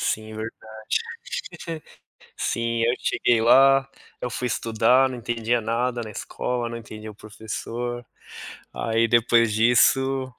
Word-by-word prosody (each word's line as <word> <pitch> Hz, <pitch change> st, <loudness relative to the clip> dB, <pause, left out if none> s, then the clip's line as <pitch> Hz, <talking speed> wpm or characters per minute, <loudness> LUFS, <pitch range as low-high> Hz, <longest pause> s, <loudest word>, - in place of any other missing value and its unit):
Sim, 110 Hz, 0 st, -2 dB
verdade. 110 Hz, +1 st, -5 dB, 1.8 s
Sim, 115 Hz, 0 st, -1 dB
eu 120 Hz, +1 st, +3 dB
cheguei 120 Hz, -2 st, +1 dB
lá, 135 Hz, +3 st, +5 dB, 0.3 s
eu 125 Hz, -, -3 dB
fui 125 Hz, -, -3 dB
estudar, 120 Hz, +3 st, +3 dB
não 130 Hz, -1 st, -6 dB
entendia 120 Hz, 0 st, -1 dB
nada 120 Hz, +2 st, -1 dB
na 110 Hz, -, -7 dB
escola, 120 Hz, +3 st, -3 dB
não 115 Hz, -, -6 dB
entendia 110 Hz, -1 st, -9 dB
o -, -, -12 dB
professor, 115 Hz, +3 st, -6 dB, 0.7 s
aí 115 Hz, 0 st, +1 dB
depois 115 Hz, -1 st, +3 dB
disso, 130 Hz, +3 st, +3 dB
115 Hz, 120 wpm, -24 LUFS, 110-125 Hz, 1.8 s, lá